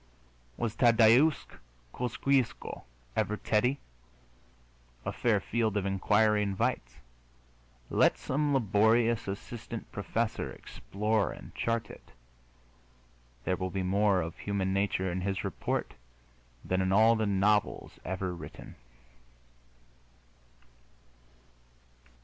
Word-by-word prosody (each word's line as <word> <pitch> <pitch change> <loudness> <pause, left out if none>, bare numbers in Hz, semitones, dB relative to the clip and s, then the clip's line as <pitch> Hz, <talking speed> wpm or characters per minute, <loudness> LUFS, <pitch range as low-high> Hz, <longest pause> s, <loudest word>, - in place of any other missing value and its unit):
Was 115 -2 -2
Tadeusz 120 +5 +5 0.5
Kosciusko 125 0 -1 0.3
ever 105 - 0
Teddy? 125 +7 +1 1.3
A - - -1
fair - - +1
field 110 -2 -1
of 100 - -1
inquiry 105 +2 +2
invites. 95 -11 -1 1.0
Let - - +4
some 145 +2 -1
laborious 115 -1 +2
assistant 115 +3 -7
professor 110 +2 -2
explore 105 0 -2
and - - -11
chart 115 0 -2
it. - - -15 1.3
There 90 - 0
will 95 0 -3
be 95 0 -2
more 100 0 +2
of 80 0 -6
human 95 -2 -1
nature 95 -2 0
in 90 +1 -3
his 95 0 -2
report - - -3 0.7
than 95 0 0
in 95 0 0
all 110 +3 +5
the 110 -1 0
novels 100 +1 +1
ever 95 0 -3
written. 85 - -10
105 Hz, 100 wpm, -30 LUFS, 95-115 Hz, 1.3 s, Tadeusz